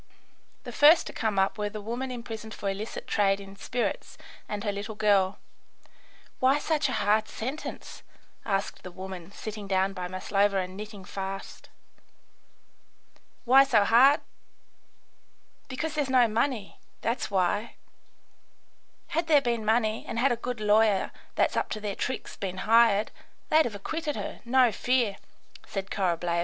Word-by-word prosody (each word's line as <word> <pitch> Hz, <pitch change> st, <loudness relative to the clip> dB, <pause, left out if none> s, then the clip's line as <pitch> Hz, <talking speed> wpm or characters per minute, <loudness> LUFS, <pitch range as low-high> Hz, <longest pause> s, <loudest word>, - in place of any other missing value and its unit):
The -, -, -7 dB
first 310 Hz, +3 st, +6 dB
to -, -, -7 dB
come 220 Hz, -4 st, -1 dB
up 195 Hz, +2 st, +1 dB
were 210 Hz, 0 st, -1 dB
the 215 Hz, -, -7 dB
woman 240 Hz, +5 st, -4 dB
imprisoned 225 Hz, -3 st, -7 dB
for 200 Hz, -, -5 dB
illicit 200 Hz, +3 st, -4 dB
trade 200 Hz, -1 st, +2 dB
in 195 Hz, 0 st, -11 dB
spirits, 240 Hz, +4 st, -3 dB, 0.3 s
and 205 Hz, -1 st, -4 dB
her 205 Hz, -, 0 dB
little 205 Hz, +2 st, -6 dB
girl. 200 Hz, -2 st, +2 dB, 1.0 s
"Why 265 Hz, +2 st, +4 dB
such 300 Hz, -1 st, 0 dB
a -, -, -2 dB
hard 215 Hz, 0 st, +2 dB
sentence?" 265 Hz, +7 st, -6 dB, 0.4 s
asked 195 Hz, 0 st, -2 dB
the 185 Hz, -, -8 dB
woman, 185 Hz, -1 st, -8 dB
sitting 210 Hz, 0 st, -7 dB
down 190 Hz, 0 st, +1 dB
by 180 Hz, -2 st, -4 dB
Maslova 195 Hz, +2 st, +1 dB
and 185 Hz, 0 st, -3 dB
knitting 205 Hz, -1 st, -8 dB
fast. 195 Hz, 0 st, -6 dB, 1.8 s
"Why 265 Hz, +3 st, +7 dB
so 230 Hz, -6 st, +3 dB
hard? 255 Hz, +7 st, +6 dB, 1.5 s
Because 300 Hz, +4 st, -3 dB
there's 295 Hz, -3 st, -1 dB
no 255 Hz, -2 st, +5 dB
money. 225 Hz, -1 st, -2 dB, 0.2 s
That's 235 Hz, +2 st, -1 dB
why! 200 Hz, +3 st, 0 dB, 1.3 s
Had 330 Hz, +2 st, -1 dB
there 305 Hz, -3 st, +6 dB
been 235 Hz, -4 st, -1 dB
money, 220 Hz, 0 st, +1 dB
and -, -, -4 dB
had 255 Hz, +3 st, +3 dB
a -, -, +2 dB
good 240 Hz, 0 st, -5 dB
lawyer 210 Hz, -1 st, +3 dB, 0.2 s
that's -, -, +2 dB
up -, -, 0 dB
to 215 Hz, -, -5 dB
their 205 Hz, -2 st, -4 dB
tricks 260 Hz, -, -4 dB
been 185 Hz, -1 st, -5 dB
hired, 225 Hz, -2 st, +4 dB, 0.4 s
they'd 315 Hz, +1 st, +5 dB
have 220 Hz, -, -4 dB
acquitted 305 Hz, +8 st, -3 dB
her, -, -, -6 dB
no 250 Hz, 0 st, +4 dB
fear," 240 Hz, -4 st, +1 dB, 0.5 s
said 195 Hz, -1 st, -5 dB
Korableva. 175 Hz, -3 st, 0 dB
215 Hz, 150 wpm, -27 LUFS, 195-245 Hz, 1.8 s, Why